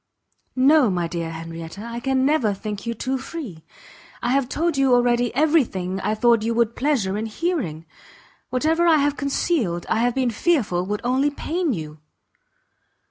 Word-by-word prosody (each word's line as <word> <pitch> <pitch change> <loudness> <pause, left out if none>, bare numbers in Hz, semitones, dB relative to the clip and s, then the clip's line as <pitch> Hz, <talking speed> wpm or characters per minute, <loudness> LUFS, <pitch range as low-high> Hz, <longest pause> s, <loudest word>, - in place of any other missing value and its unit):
"No, 270 0 +5
my 175 -3 -1
dear 165 -1 -4
Henrietta, 165 +3 -8
I 235 0 -5
can 265 +1 +1
never 260 -9 +2
think 210 +1 -6
you 235 - -2
too 260 +4 -2
free; 255 - -8 0.6
I - - 0
have 270 -1 +1
told 335 +2 0
you 270 -2 +4
already 245 -1 +2
every 310 +2 +4
thing 185 -3 -4
I 215 - 0
thought 235 0 +3
you 230 +1 -1
would 235 -1 +3
have 235 - -28
pleasure 225 -9 0
in 220 - -3
hearing; 220 - -3 0.6
whatever 320 +6 +1
I 320 -2 +6
have 290 0 +1
concealed, 275 - -1
I 220 - +1
have 245 +1 +1
been 255 -2 +1
fearful 215 - 0
would 210 +1 -2
only 260 +4 +2
pain 325 +3 -2
you." 155 -6 -6
240 Hz, 175 wpm, -22 LUFS, 200-280 Hz, 0.6 s, I